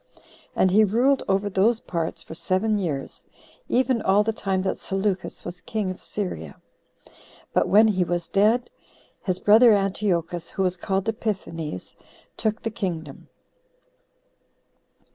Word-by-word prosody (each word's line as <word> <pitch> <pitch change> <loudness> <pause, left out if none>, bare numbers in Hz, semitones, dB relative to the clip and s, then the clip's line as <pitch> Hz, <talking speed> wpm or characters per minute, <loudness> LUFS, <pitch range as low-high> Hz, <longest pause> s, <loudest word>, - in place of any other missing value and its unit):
And 185 - +3
he 215 +3 +6
ruled 245 +7 +3
over 195 +1 +1
those 205 +4 +2
parts 165 -6 -4
for - - -10
seven 205 +5 0
years, 150 -8 -4 0.4
even 255 -2 +2
all 200 +2 +3
the 225 +1 -1
time 190 -3 -1
that 190 - -2
Seleucus 195 -1 -3
was 175 +1 -7
king 215 -5 -2
of 185 - -9
Syria. 80 - -5 0.9
But - - +2
when 215 +3 +6
he 190 -4 +2
was 175 -1 -2
dead, 215 +7 +2 0.5
his 185 -3 -1
brother 220 +4 +6
Antiochus, 185 -4 -1
who 195 - -2
was 185 -1 +1
called 190 +2 -2
Epiphanes, 185 - -4 0.4
took 220 0 -2
the 225 - -2
kingdom. 165 -9 -5
195 Hz, 135 wpm, -24 LUFS, 180-215 Hz, 0.9 s, he